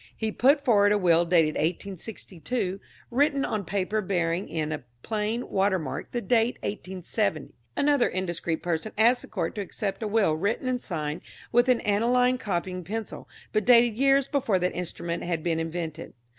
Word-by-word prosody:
He 220 Hz, -1 st, -1 dB
put 280 Hz, +5 st, +3 dB
forward 205 Hz, -4 st, +5 dB
a 210 Hz, -, +4 dB
will 170 Hz, -3 st, +4 dB
dated 165 Hz, -3 st, +3 dB
1862, 185 Hz, -, -3 dB, 0.3 s
written 280 Hz, +2 st, +2 dB
on 215 Hz, -2 st, -2 dB
paper 200 Hz, +4 st, -1 dB
bearing 175 Hz, -2 st, -1 dB
in 155 Hz, -2 st, -2 dB
a 155 Hz, -4 st, -4 dB, 0.2 s
plain 220 Hz, +2 st, -2 dB
watermark 190 Hz, -4 st, -1 dB
the 240 Hz, -, -2 dB
date 235 Hz, 0 st, +2 dB
1870! 190 Hz, -3 st, -3 dB, 0.2 s
Another 285 Hz, -3 st, +3 dB
indiscreet 175 Hz, -3 st, -2 dB
person 175 Hz, +5 st, -2 dB
asked 240 Hz, +3 st, +4 dB
the -, -, -10 dB
Court 170 Hz, -5 st, -3 dB
to 210 Hz, -, -4 dB
accept 200 Hz, +1 st, -4 dB
a 220 Hz, -, -1 dB
will 205 Hz, -6 st, +2 dB
written 200 Hz, +10 st, -1 dB
and 250 Hz, -1 st, 0 dB
signed 155 Hz, -2 st, -4 dB, 0.3 s
with 240 Hz, +2 st, +4 dB
an 250 Hz, -2 st, +3 dB
aniline 245 Hz, +4 st, +2 dB
copying 185 Hz, -4 st, -3 dB
pencil, 215 Hz, +4 st, -6 dB, 0.2 s
but 215 Hz, -1 st, +2 dB
dated 240 Hz, -1 st, +5 dB
years 275 Hz, +2 st, +3 dB
before 250 Hz, -9 st, +1 dB
that 180 Hz, 0 st, 0 dB
instrument 170 Hz, -1 st, -4 dB
had 170 Hz, -3 st, -2 dB
been 165 Hz, -2 st, 0 dB
invented. 165 Hz, -1 st, -5 dB
200 Hz, 165 wpm, -27 LUFS, 170-235 Hz, 0.3 s, forward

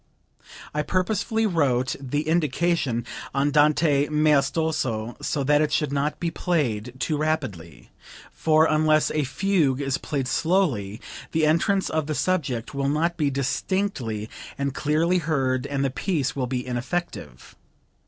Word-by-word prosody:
I 150 Hz, -, 0 dB
purposely 205 Hz, +6 st, 0 dB
wrote 135 Hz, -, +1 dB
the 145 Hz, +3 st, -3 dB
indication 155 Hz, -6 st, +1 dB, 0.3 s
'Andante 145 Hz, +1 st, +3 dB
maestoso,' 150 Hz, -6 st, +1 dB
so 140 Hz, -, -1 dB
that 145 Hz, +2 st, +3 dB
it 150 Hz, -1 st, +1 dB
should 150 Hz, -1 st, 0 dB
not 145 Hz, +2 st, -1 dB
be 170 Hz, -1 st, -1 dB
played 125 Hz, -, -1 dB
too 150 Hz, +3 st, -1 dB
rapidly; 130 Hz, -, -3 dB, 0.4 s
for 155 Hz, 0 st, +3 dB
unless 155 Hz, 0 st, +3 dB
a 150 Hz, -, 0 dB
fugue 150 Hz, -2 st, +1 dB
is 135 Hz, -2 st, -1 dB
played 135 Hz, -3 st, -3 dB
slowly 130 Hz, -, 0 dB, 0.3 s
the 160 Hz, -1 st, +3 dB
entrance 180 Hz, +5 st, +2 dB
of 155 Hz, -2 st, -1 dB
the 155 Hz, -, -2 dB
subject 135 Hz, -12 st, -1 dB
will 140 Hz, 0 st, 0 dB
not 165 Hz, +4 st, +1 dB
be 150 Hz, -4 st, +1 dB
distinctly 135 Hz, -, -2 dB, 0.3 s
and 140 Hz, -1 st, -2 dB
clearly 160 Hz, +5 st, +1 dB
heard 135 Hz, -5 st, 0 dB
and 140 Hz, -1 st, -1 dB
the 135 Hz, -, 0 dB
piece 150 Hz, -1 st, -1 dB
will 130 Hz, -3 st, -1 dB
be 125 Hz, -1 st, -3 dB
ineffective. 125 Hz, -, -5 dB
150 Hz, 135 wpm, -24 LUFS, 130-160 Hz, 0.4 s, Andante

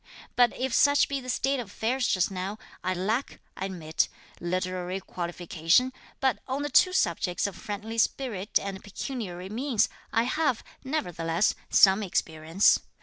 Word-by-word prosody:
But 245 Hz, -2 st, +5 dB
if 260 Hz, -1 st, -1 dB
such 285 Hz, 0 st, +5 dB
be 275 Hz, -1 st, -2 dB
the 255 Hz, -, -8 dB
state 270 Hz, +2 st, +1 dB
of 240 Hz, -, -5 dB
affairs 245 Hz, +5 st, -1 dB
just 185 Hz, +1 st, +2 dB
now, 190 Hz, +2 st, -4 dB, 0.3 s
I 185 Hz, -, 0 dB
lack, 215 Hz, +9 st, -1 dB, 0.2 s
I 190 Hz, -, -3 dB
admit, 165 Hz, -5 st, -1 dB, 0.3 s
literary 185 Hz, +1 st, -2 dB
qualification, 175 Hz, +6 st, 0 dB, 0.3 s
but 260 Hz, -6 st, +1 dB
on 270 Hz, +2 st, -2 dB
the 290 Hz, -, -3 dB
two 365 Hz, -, +6 dB
subjects 175 Hz, -, +1 dB
of 200 Hz, -3 st, -3 dB
friendly 215 Hz, +4 st, -5 dB
spirit 220 Hz, -5 st, 0 dB
and 195 Hz, -1 st, -6 dB
pecuniary 195 Hz, -4 st, -5 dB
means, 240 Hz, +1 st, +1 dB, 0.2 s
I 225 Hz, -, +3 dB
have, 260 Hz, 0 st, 0 dB, 0.2 s
nevertheless, 175 Hz, -, 0 dB, 0.2 s
some 195 Hz, +1 st, +6 dB
experience. 165 Hz, -2 st, +2 dB
205 Hz, 145 wpm, -27 LUFS, 180-255 Hz, 0.3 s, two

